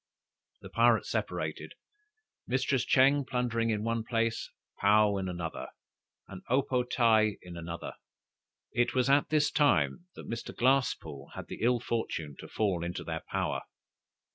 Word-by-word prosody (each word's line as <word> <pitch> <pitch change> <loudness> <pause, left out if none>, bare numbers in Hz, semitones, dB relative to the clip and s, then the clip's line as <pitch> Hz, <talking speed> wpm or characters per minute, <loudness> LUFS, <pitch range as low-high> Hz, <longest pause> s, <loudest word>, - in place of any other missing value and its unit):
The - - -11
pirates - - +3
separated: - - -3 0.7
Mistress 130 0 +1
Ching 140 +2 +4
plundering 120 -3 -1
in 105 -1 0
one 115 0 -1
place, 115 -1 -1 0.3
Paou 105 0 +4
in 95 -1 -3
another, 85 -2 -5 0.6
and 95 -2 -9
O 130 +3 +3
po 125 -1 0
tae 110 -4 +3
in 90 -1 -9
another, 85 0 -6 0.8
&c. 120 - +2
It 120 - 0
was 130 +1 +3
at 140 +1 +3
this 150 -1 +2
time 150 +4 +2
that - - -10
Mr. 115 0 -5
Glasspoole 130 - 0
had - - -8
the - - -7
ill 120 +1 +3
fortune 95 - -3
to - - -9
fall 95 -6 -1
into 85 +1 -4
their - - -4
power. - - -1
115 Hz, 150 wpm, -30 LUFS, 100-130 Hz, 0.8 s, Ching